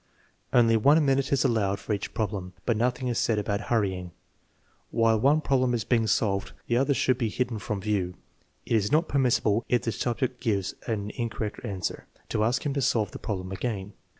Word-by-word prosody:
Only 115 -2 +5
one 145 +7 +5
minute 135 0 +1
is 140 -1 +2
allowed 100 -5 +1
for 100 +2 -3
each 100 - -4
problem, 100 -4 -3
but 120 - +2
nothing 125 +3 0
is 120 - 0
said 115 - +1
about 100 0 -1
hurrying. 95 -6 0 0.8
While 115 -1 +3
one 145 +6 +4
problem 130 -4 +2
is 115 - -1
being 115 -1 +1
solved, 100 -2 0
the 120 - 0
others 135 +2 +2
should 130 -1 +2
be 115 -3 0
hidden 120 0 -2
from 100 -1 -3
view. 95 -3 -1 0.5
It - - +1
is 105 -1 0
not 160 +2 +3
permissible, 120 -5 +2
if 120 -2 +2
the 115 - 0
subject 125 +3 -2
gives 100 -6 0
an 105 -2 -2
incorrect 115 -3 -4
answer, 95 -7 -4 0.2
to 105 - +1
ask 125 +5 0
him 145 - 0
to 140 - -1
solve 110 -6 +1
the - - -8
problem 95 -3 -4
again. 100 0 -4
115 Hz, 195 wpm, -27 LUFS, 100-125 Hz, 0.8 s, Only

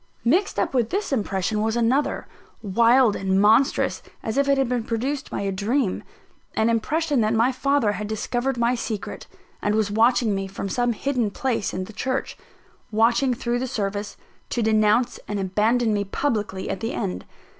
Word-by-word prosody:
Mixed 355 - +2
up - - 0
with 240 -3 +1
this 400 -5 -2
impression 210 -2 -1
was 220 +1 0
another, 240 +5 +1 0.4
wild 230 +3 +4
and 190 0 +1
monstrous 220 +7 +3 0.2
as 220 - -3
if 280 0 +2
it 275 - +4
had 270 -2 +2
been 245 -1 -1
produced 265 +6 -3
by - - -3
a 200 -1 -1
dream 205 +3 0 0.5
an 220 +1 +2
impression 290 +4 +1
that 215 +1 +1
my 230 +4 +3
father 270 -3 +1
had 210 0 -4
discovered 240 +4 -2
my 235 +1 +2
secret, 225 -4 -5 0.3
and 205 +1 +1
was 215 -2 +1
watching 230 0 +3
me 195 0 -2
from 195 0 -5
some 245 +3 +1
hidden 245 -2 -1
place 235 0 -1
in 185 - -3
the 220 - -10
church; 260 +5 -2 0.6
watching 235 +4 +3
through 240 +1 -1
the 260 - -2
service, 205 -2 -3 0.3
to 240 - -1
denounce 215 +2 +2
and 205 -1 -2
abandon 215 +4 +1
me 205 -1 0
publicly 205 -3 -2
at 195 - -3
the 225 +1 -3
end. 90 0 -3
230 Hz, 175 wpm, -23 LUFS, 210-255 Hz, 0.6 s, wild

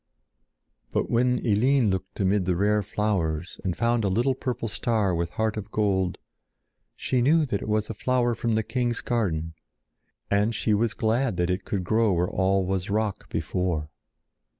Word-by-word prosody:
But - - -1
when 125 +1 +3
Eline 120 +1 +3
looked 95 0 -4
amid 95 -1 +2
the 90 -1 +1
rare 105 +3 +2
flowers 95 -5 -2
and 95 -3 -2
found 120 0 +1
a 100 - +1
little 120 +8 +2
purple 125 -3 -3
star 105 -3 0
with 85 0 -1
heart 110 -1 -1
of 105 -1 -5
gold, 95 -4 0 0.8
she 125 - 0
knew 155 +5 +4
that 105 -7 -2
it - - -5
was 105 0 +1
a - - -4
flower 120 +2 +1
from 115 0 -1
the 110 - +1
king's 120 0 -1
garden, 80 -9 -1 0.8
and 105 +3 +2
she 110 0 +1
was 110 +1 +1
glad 115 0 0
that 90 +1 +1
it 90 +2 -2
could 95 -3 -2
grow 110 +1 +2
where 90 +1 +1
all 95 0 +1
was 95 0 -2
rock 105 -1 -1
before. 85 -5 -2
105 Hz, 175 wpm, -26 LUFS, 95-115 Hz, 0.8 s, knew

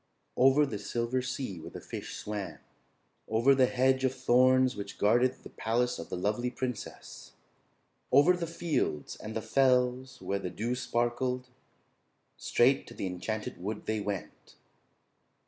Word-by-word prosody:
Over 135 +3 +5
the 110 -7 -5
Silver 120 +4 -1
Sea 125 -7 -4
where 80 - -8
the - - -8
fish - - -7
swam, 105 -2 -5 0.7
over 115 +5 +4
the 130 -1 +4
hedge 130 +1 +2
of 130 0 +1
thorns 130 +1 +4
which 100 -1 -7
guarded 120 +5 +3
the - - -9
palace 120 +2 0
of 85 - -7
the - - -3
lovely 105 +7 0
princess, 125 -3 -6 0.8
over 145 +7 +6
the 175 -2 -3
fields 165 - -2
and 110 +1 -7
the 110 - -2
fells 125 +1 +2
where 100 0 -2
the 90 - -4
dew 110 +8 -2
sparkled, 125 +1 -1 0.9
straight 130 +3 +2
to - - -11
the - - -4
Enchanted 100 +4 -4
Wood 105 +3 -4
they 110 0 -1
went. 100 -3 -6
125 Hz, 145 wpm, -30 LUFS, 105-130 Hz, 0.9 s, over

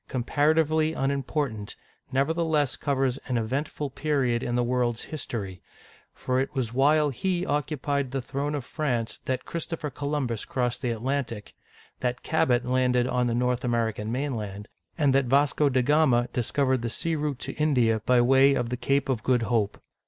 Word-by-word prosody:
comparatively 155 +4 +2
unimportant, 135 -6 -2 0.4
nevertheless 150 +1 +1
covers 135 -2 0
an 125 -2 0
eventful 135 +5 -2
period 135 -5 0
in 120 -1 -2
the 125 - +2
world's 120 -1 0
his 155 -3 -6
tory, 95 -6 -5 0.5
for 130 0 -1
it 135 +2 -2
was 120 -4 -2
while 145 +3 +3
he 180 +5 -1
occupied 145 -1 -1
the 135 +1 -2
throne 140 +3 -3
of 140 -4 -4
France 125 -8 -2
that 130 -1 -2
Christopher 165 -3 -4
Columbus 140 -5 -2
crossed 125 -1 -2
the 125 - -1
Atlantic, 115 -2 -3 0.5
that 125 -1 -2
Cabot 125 -6 +2
landed 125 -1 +2
on 125 -1 +1
the 115 - 0
North 125 +1 0
American 115 -3 -1
mainland, 110 -7 -3 0.3
and 145 -4 +3
that 135 0 +3
Vasco 140 +3 +3
da 130 -1 +2
Ga'ma 130 -4 +3
discovered 130 +1 +1
the 120 - -2
sea 165 +7 -2
route 150 -3 -2
to - - -5
India 125 -8 +2
by 125 +2 +4
way 135 +3 +5
of 120 - -1
the 125 - -2
Cape 135 +3 +1
of 130 -5 -1
Good 125 0 +2
Hope. 110 -2 0
130 Hz, 165 wpm, -26 LUFS, 120-145 Hz, 0.5 s, way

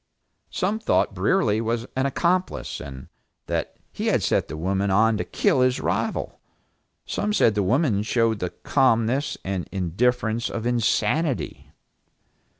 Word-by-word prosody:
Some 205 +3 -1
thought 225 - +1
Brierly 110 - +1
was 115 +1 -1
an 130 +1 +1
accomplice, 180 +6 -1
and 65 -2 -9 0.4
that - - -3 0.2
he - - -3
had - - +2
set - - +1
the 80 - -6
woman 95 +4 0
on 110 +3 +4
to - - -1
kill 130 - +1
his 125 0 +2
rival. - - -2 0.7
Some 210 0 -2
said 115 - +4
the 105 - 0
woman 115 - +2
showed 115 -1 +1
the 90 - -2
calmness 130 - +1
and 95 -2 -3
indifference 110 +5 0
of 115 -1 -4
insanity. 120 +4 0
115 Hz, 140 wpm, -24 LUFS, 100-130 Hz, 0.7 s, on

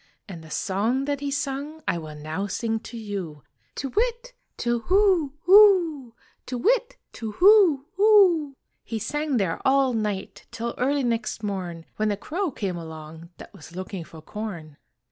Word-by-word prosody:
And 170 -5 -9
the 160 - -13
song 215 - 0
that 285 -1 -1
he 285 0 -3
sung 285 +2 -4
I 170 - +1
will 155 -2 -8
now 155 +6 -4
sing 225 +3 -2
to 235 +1 -9
you 190 - -6 0.3
"To 275 - -4
whit! 480 - -1 0.2
To 240 -1 -1
whoo, 370 -7 +3
hoo! 350 - +5 0.3
To 250 - -3
whit! - - +1 0.2
To 220 -3 -6
whoo, 365 -8 +6
hoo!" 375 -9 +5 0.3
He 230 - -4
sang 295 +4 -1
there 190 -6 -1
all 265 -1 +3
night 210 -3 -3
Till 235 0 -4
early 275 +2 +1
next 230 -2 -2
morn, 180 -5 -4
When 215 0 +1
a 205 - -1
crow 350 - -2
came 195 -9 -4
along 160 0 -9
That - - -12
was 165 +3 -13
looking 185 -1 -5
for 160 -1 -13
corn. 170 -8 -7
235 Hz, 165 wpm, -25 LUFS, 190-305 Hz, 0.3 s, whoo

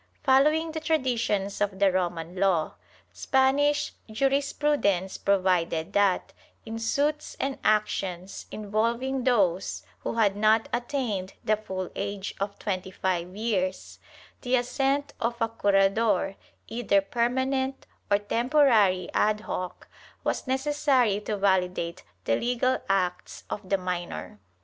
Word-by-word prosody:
Following 305 +4 +4
the 315 - -3
traditions 240 -11 0
of 200 -2 0
the 195 -1 +4
Roman 175 -2 -2
law, 185 -4 +1 0.4
Spanish 280 +2 +2 0.2
jurisprudence 270 -6 +1
provided 185 -3 +1
that, 200 -2 +2 0.3
in 225 0 -5
suits 290 +6 -1
and 270 0 -2
actions 195 -3 -1
involving 230 +5 -1
those 190 - +1 0.2
who 95 - -4
had 210 -4 +3
not 215 +2 +3
attained 240 -6 -2
the 215 - +3
full 190 -4 -5
age 200 -1 -4
of 200 +1 -3
twenty 190 -3 -3
five 185 -1 -2
years, 200 -4 -2 0.4
the 250 0 +1
assent 275 +3 0
of 235 +1 -1
a 230 - +2
curador, 195 -1 +2 0.3
either 220 -4 +2
permanent 260 +5 -1 0.2
or 200 - +5
temporary 220 - +3
ad 210 0 +2
hoc, 180 -3 -5 0.4
was - - -2
necessary 265 -5 +2
to 210 0 -3
validate 185 -3 0 0.2
the 115 - +2
legal 250 - +1
acts 180 -2 -1
of 190 -2 -5
the 195 - +3
minor.' 180 - -5
210 Hz, 120 wpm, -27 LUFS, 190-260 Hz, 0.4 s, or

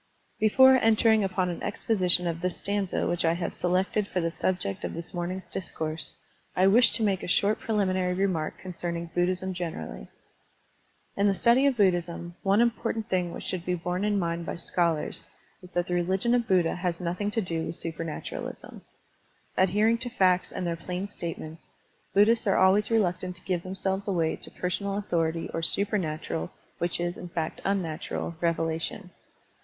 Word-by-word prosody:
BEFORE 260 +5 +7
entering 220 -2 +4
upon 185 -1 0
an 175 - -5
exposition 180 -5 +3
of 170 -1 -2
this 180 0 -1
stanza 200 -2 -1
which 175 0 0
I 165 0 +3
have 170 0 -3
selected 190 +3 0
for 185 - -2
the 165 -1 0
subject 165 - -2
of - - -4
this 170 +1 -7
morning's 180 +2 -3
discourse, 160 -5 -4 0.4
I 185 - +4
wish 225 +4 +6
to 230 - 0
make 195 -3 +1
a - - -5
short 200 +4 +2
preliminary 185 -4 0
remark 180 -5 -1
concerning 170 -2 -5
Buddhism 185 +1 0
generally. 80 - -5 1.1
In 200 +1 +3
the 200 - +3
study 245 +7 +5
of 270 -3 +1
Buddhism, 175 -3 +1
one 200 +3 +3
important 230 -2 0
thing 180 -2 0
which - - -7
should 185 -2 -3
be 180 0 0
borne 180 +2 -2
in 210 -1 +1
mind 170 -2 -1
by - - -3
scholars 170 -3 -1 0.4
is 180 - -13
that 175 0 +1
the 180 - -3
religion 190 +6 +1
of 240 -2 +2
Buddha 180 -3 +3
has 175 -2 -2
nothing 180 +3 -2
to 220 - -1
do 165 -4 -2
with - - -4
supematuralism. 165 -1 -6 0.7
Adhering 210 +5 +3
to 245 0 -4
facts 185 -6 +2
and 185 - -4
their 170 -1 -1
plain 180 +3 -4
statements, 165 -4 -6 0.5
Buddhists 220 +2 +4
are 195 - +3
always 195 +3 +4
reluctant 185 -5 0
to 180 - -8
give 180 -2 -1
themselves 190 +2 -2
away 170 -5 +1
to - - -8
pergonal 195 +2 -2
authority 165 -4 -1
or 165 - -1
supernatural 165 - 0 0.2
— - - -35
^which 175 0 +1
is, 175 +1 -2
in 180 - -8
fact, 165 -2 -3
unnatural 170 -3 -2
— - - -28
^revelation. 165 +3 -1
180 Hz, 175 wpm, -27 LUFS, 170-200 Hz, 1.1 s, BEFORE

